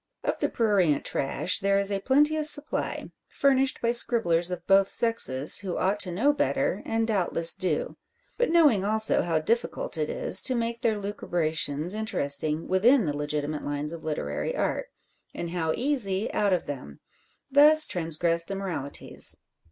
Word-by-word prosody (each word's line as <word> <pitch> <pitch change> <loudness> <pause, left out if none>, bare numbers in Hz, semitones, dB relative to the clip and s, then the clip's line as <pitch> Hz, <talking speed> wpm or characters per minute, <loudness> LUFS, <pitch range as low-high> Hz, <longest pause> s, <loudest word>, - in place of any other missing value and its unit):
Of - - -2
the - - -1
prurient 195 -10 +1
trash 175 +8 -1
there 200 0 +1
is 200 0 0
a 200 - -1
plenteous 295 +6 +2
supply, 290 0 -2 0.2
furnished 270 -1 +1
by 235 - +2
scribblers 185 -8 +4
of 180 -1 -6
both 195 0 +3
sexes, 155 - +1
who 185 -2 -5
ought 195 +3 0
to 185 -3 -2
know 250 +12 +1
better, - - -1
and 225 0 -1
doubtless 175 -5 +3
do; 185 -6 -3 0.4
but - - 0
knowing 300 - +3
also 220 +2 +1
how 165 -2 -1
difficult 210 -1 -2
it 150 - -2
is - - +1
to 255 - +3
make 230 0 -3
their 220 -2 0
lucubrations 170 -5 -2
interesting 155 -8 +1
within 225 +5 +3
the 145 -2 -3
legitimate 150 +1 -3
lines 145 +2 -2
of 165 - -9
literary 75 - -4
art, - - -2 0.5
and 170 -1 -5
how 165 -3 -2
easy 230 -7 -1
out 205 -1 0
of 180 - 0
them, 125 - -8 0.5
thus 305 +2 +6
transgress 165 -1 +1
the 195 +3 -6
moralities. 180 -8 -3
195 Hz, 160 wpm, -26 LUFS, 160-230 Hz, 0.5 s, thus